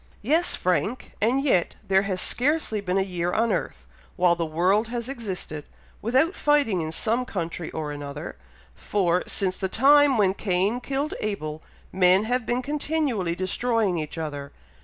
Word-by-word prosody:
"Yes, 320 +9 +3
Frank! 185 - -1
and 250 +6 +2
yet 215 -12 +2
there 190 0 +4
has 195 -2 -2
scarcely 260 - 0
been 185 -1 -1
a 195 - +3
year 175 -2 -2
on 225 +4 +1
earth, 70 - -3 0.3
while 180 -1 +3
the 170 -1 -2
world 185 +8 +2
has 235 0 -4
existed, 195 - -5 0.4
without 265 - +2
fighting 285 - +2
in 155 0 -3
some 230 +8 0
country 170 -7 -4
or 155 -2 -4
another, 145 0 -7 0.4
for, 180 - 0
since 185 -2 0
the 190 - -1
time 280 +4 +5
when 195 -3 +3
Cain 195 +4 0
killed 275 +4 -2
Abel, 155 -7 -4 0.3
men 185 +1 +4
have 245 0 -1
been 245 +1 0
continually 285 - -1
destroying 195 0 0
each 155 +2 -5
other. 145 -3 -5
200 Hz, 160 wpm, -25 LUFS, 175-245 Hz, 0.4 s, time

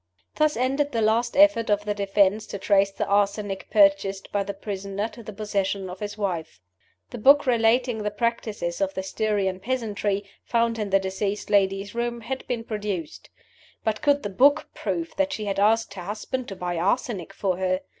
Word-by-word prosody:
Thus 305 -3 +2
ended 275 +3 0
the 230 - +1
last 230 +3 +1
effort 295 -7 +5
of 205 0 +1
the 210 - 0
defense 200 +1 +2
to - - -5
trace 200 0 +3
the 195 - -3
arsenic 200 -1 0
purchased 195 -1 +3
by 205 - +1
the 200 0 -4
prisoner 200 +1 -4
to 230 +1 -12
the 215 - -8
possession 200 -2 -2
of 185 - -9
his 210 0 -5
wife. 170 - -3 0.5
The - - -6
book 280 +6 +6
relating 240 -1 +2
the 210 - -1
practices 210 -5 -2
of 195 0 0
the 190 - -2
Styrian 195 -2 -1
peasantry 210 -4 -1 0.2
(found 230 -1 +1
in 210 -2 -2
the 195 - +5
deceased 195 +2 -3
lady's 195 0 +2
room) 235 0 -2
had 260 +4 -5
been 240 -3 -2
produced. 205 -7 -5 0.5
But 220 -1 -1
could 285 -1 +2
the 205 - -2
book 275 +9 +4
prove 335 -1 -3
that 290 0 +1
she 215 -6 -4
had 195 -1 -1
asked 220 +1 +3
her 190 - -7
husband 215 +7 -4
to 195 - -6
buy 175 -1 -3
arsenic 195 0 -1
for 185 -3 -1
her? 185 0 0
205 Hz, 185 wpm, -25 LUFS, 195-230 Hz, 0.5 s, book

